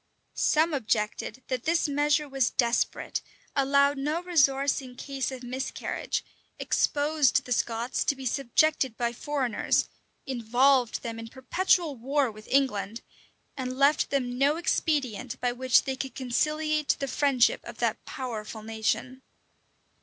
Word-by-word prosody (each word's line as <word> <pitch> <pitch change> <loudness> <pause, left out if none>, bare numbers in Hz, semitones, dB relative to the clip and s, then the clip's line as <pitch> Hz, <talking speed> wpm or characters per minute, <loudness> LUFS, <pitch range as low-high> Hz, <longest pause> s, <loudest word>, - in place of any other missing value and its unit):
Some 315 +1 +2
objected 220 -1 -2
that 255 -2 -2
this 330 0 +2
measure 295 +1 +1
was 270 -3 +1
desperate, 235 -1 0 0.3
allowed 280 0 +3
no 305 +5 -1
resource 280 -6 +2
in 255 -2 -11
case 270 0 -3
of 260 -1 -8
miscarriage, 255 +2 -3 0.3
exposed 290 -2 +2
the 250 - -9
Scots 235 +1 0
to 280 - +2
be 265 0 -9
subjected 265 0 +1
by 235 -1 -1
foreigners, 260 -2 0 0.4
involved 250 0 +2
them 230 -1 -5
in 225 - -7
perpetual 315 +6 +1
war 270 +1 0
with 215 0 -14
England, 230 -5 0 0.5
and 255 -1 -4
left 280 +2 +3
them 250 -3 -1
no 285 +3 +3
expedient 270 -8 -1
by 245 - 0
which 255 0 +3
they 265 -1 -2
could 265 0 -6
conciliate 305 +4 0
the 275 - -3
friendship 270 -3 +2
of - - -9
that - - -1
powerful 220 -4 -6
nation. 225 +4 -2
265 Hz, 135 wpm, -27 LUFS, 240-285 Hz, 0.5 s, allowed